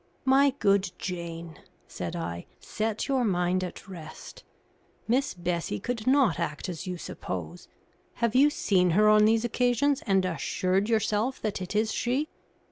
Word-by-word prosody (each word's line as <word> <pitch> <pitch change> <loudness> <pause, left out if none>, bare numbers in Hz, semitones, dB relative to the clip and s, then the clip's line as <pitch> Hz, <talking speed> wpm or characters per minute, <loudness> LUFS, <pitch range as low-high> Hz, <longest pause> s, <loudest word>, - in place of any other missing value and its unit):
"My 270 +2 +5
good 200 -5 +2
Jane," 170 -3 -6 0.3
said 85 -1 -5
I, 85 +1 -5
"set 220 +1 -3
your 265 -3 +1
mind 185 -3 +1
at 180 - -7
rest. 165 -5 -10 0.6
Miss 255 +1 +1
Bessie 170 - -2
could 240 -1 -4
not 265 -8 +4
act 160 0 -3
as 180 +2 -6
you 180 -1 -3
suppose. - - -6 0.5
Have 235 -2 0
you 275 +4 +6
seen 185 -10 +2
her 215 0 +5
on 215 0 +6
these 225 +1 +3
occasions 250 +4 +1
and 195 -2 +3
assured 185 +3 0
yourself 220 +3 +1
that 210 -3 -2
it 185 +3 -5
is 220 +1 +1
she?" 265 +6 -1
205 Hz, 150 wpm, -27 LUFS, 180-240 Hz, 0.6 s, you